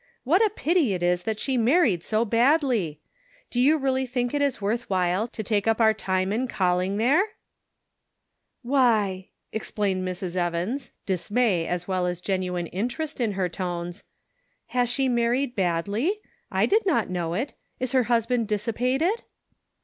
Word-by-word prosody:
What 350 - +4
a 435 - +4
pity 325 - +1
it 175 - -4
is 175 0 +1
that 220 -1 -2
she 265 +1 -1
married 240 - +3
so 220 +5 0
badly! 235 - +2 0.5
Do 245 - -1
you 300 +5 +5
really 265 -2 0
think 245 0 -1
it 290 - 0
is 280 -3 +1
worth 225 +4 -2
while 185 +3 +1
to 225 -2 -6
take 205 0 0
up 225 0 +2
our 220 -1 +5
time 190 -2 -1
in 250 +4 0
calling 185 -2 0
there? 270 - +4 0.5
" - - -54 0.2
" - - -53
Why! 210 -8 +2
" - - -53
exclaimed 205 -3 -1
Mrs. 185 -1 -4
Evans, 180 +9 -2
dismay* 195 -1 +1
as 180 0 -3
well 185 -2 0
as 175 -1 -3
genuine 180 -2 -2
interest 250 - -3
in 220 -4 +1
her 190 -2 0
tones. 175 -1 -5 0.3
" - - -46
Has 245 -1 +2
she 270 +2 +1
married 245 +2 +1
badly? 200 - 0 0.3
I - - +2
did 435 +3 +3
not 235 - +1
know 170 -2 -2
it. 255 +8 -2 0.3
Is 255 -1 -2
her 260 -3 +3
hus 235 -2 +2
band 240 -2 0
dissipated 250 - 0
220 Hz, 170 wpm, -25 LUFS, 185-255 Hz, 0.5 s, you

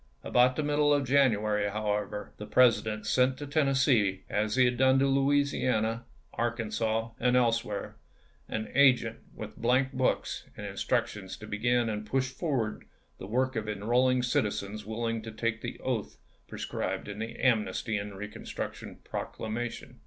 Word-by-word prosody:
About 125 +1 +4
the 155 - -1
middle 145 0 +2
of 145 -2 +2
January, 110 -6 +3
however, 105 0 -3
the 105 - -7
President 110 -2 +3
sent 125 +4 +2
to 145 - -6
Tennessee, 135 -9 +2
as 105 +1 0
he 130 -1 +5
had 125 0 +2
done 130 +1 +4
to 135 - +3
Louisiana, 135 -5 +1 0.3
Arkan 115 -1 -2
sas, 115 0 0
and 125 +1 +2
elsewhere, 115 -4 0 0.5
an 110 0 -4
agent 125 -5 +4 0.2
with 110 0 -8
blank 130 +3 +2
books 130 -1 0
and - - -6
instructions 95 -3 -2
to 110 - -10
begin 120 +3 +1
and 105 -1 -3
push 130 +4 -1
forward 130 -7 -2 0.3
the 95 - -7
work 130 +4 0
of 110 -1 -2
enrolling 125 +5 +2
citizens 105 -3 -1
willing 115 0 -2
to 110 0 -7
take 110 0 -2
the 120 - -6
oath 125 -5 -3 0.3
pre - - -9
scribed - - -3
in 105 0 -6
the 115 +1 -5
Amnesty 110 -3 +1
and 100 -1 -4
Reconstruction 105 +2 -6
Proc - - -5
lamation. 115 +2 -5
115 Hz, 155 wpm, -29 LUFS, 105-130 Hz, 0.5 s, he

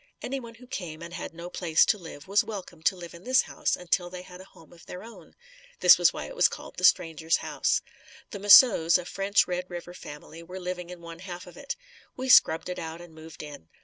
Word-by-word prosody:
Anyone 245 -3 -5
who 250 +2 -15
came 170 -9 -7
and 170 0 -9
had - - -6
no 170 +1 -9
place 170 -3 +2
to - - +2
live 160 -3 -11
was 200 +2 +3
welcome 190 -6 -8
to 175 - +2
live 175 -2 -10
in 170 +1 -13
this 260 +1 +3
house - - -2
until 180 0 -1
they 180 0 -8
had 180 0 -12
a - - -13
home 165 -4 -19
of 170 - -18
their 180 +2 -8
own. 230 +1 -14 0.4
This - - +7
was - - +5
why - - -6
it - - -9
was - - +5
called - - -10
the - - -7
"Stranger's 165 -2 +3
House." - - -1 0.5
The 200 - -6
Mousseau's, 200 -5 +7
a 180 - -7
French 195 +2 +1
Red 180 0 -4
River 175 0 -8
family 155 0 -11
were 180 +3 -9
living 180 -1 -5
in 180 -1 -10
one 170 0 -10
half 180 -1 -8
of 180 - -14
it. 285 +9 -6 0.4
We 260 +1 -4
scrubbed 160 -9 +5
it 180 - -5
out 165 0 -6
and 175 -2 -13
moved 160 0 -11
in. 145 - -11
180 Hz, 235 wpm, -27 LUFS, 165-195 Hz, 0.5 s, This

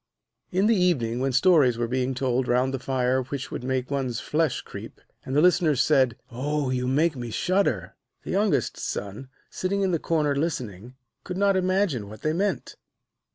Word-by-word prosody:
In 190 +2 +2
the 225 +1 +4
evening, 135 - +1
when 135 +1 0
stories 135 -4 +4
were 120 0 -1
being 130 +1 -1
told 125 0 0
round 125 +2 +2
the 135 - -2
fire 130 0 0
which 135 +1 -6
made 130 +1 -3
one's 130 -4 -1
flesh 155 -3 0
creep, - - -10 0.2
and 130 - -4
the 150 - +4
listeners 170 -6 +3
said: 130 -6 +3
'Oh, 140 +2 -1
you 125 -1 -1
make 150 +4 +2
me 120 -2 -5
shudder!' 185 - 0 0.3
the - - -5
youngest 205 +1 +1
son, 105 +7 -5 0.2
sitting 195 +2 -1
in 190 - +1
the 165 - +1
corner 150 -4 0
listening, 125 - -3 0.3
could 180 -1 -5
not 200 0 +3
imagine 185 - 0
what 110 0 -12
they 155 - +1
meant. 195 +4 -2
135 Hz, 175 wpm, -25 LUFS, 125-175 Hz, 0.3 s, the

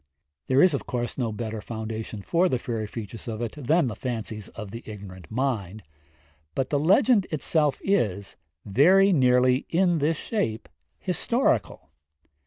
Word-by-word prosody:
There 130 +1 +5
is 185 -3 +5
of 140 - -3
course 120 -1 -3
no 120 -4 -1
better 110 0 -4
foundation 110 -2 -6
for 175 - +2
the 130 - +1
fairy 115 -3 -4
features 110 +1 -8
of 110 -2 -4
it 120 -2 -3
than 150 +3 +1
the 115 -4 -3
fancies 110 -4 -5
of 105 -3 -9
the 115 - -7
ignorant 95 -5 -10
mind, 110 -5 -2 0.7
but 130 - -1
the 145 - +2
legend 200 - +4
itself 155 -1 +1
is 105 - 0 0.3
very 185 - +5
nearly 125 -2 +3
in 175 -1 +2
this 155 +2 +1
shape 115 - -2 0.3
historical. - - -1
125 Hz, 150 wpm, -26 LUFS, 110-155 Hz, 0.7 s, There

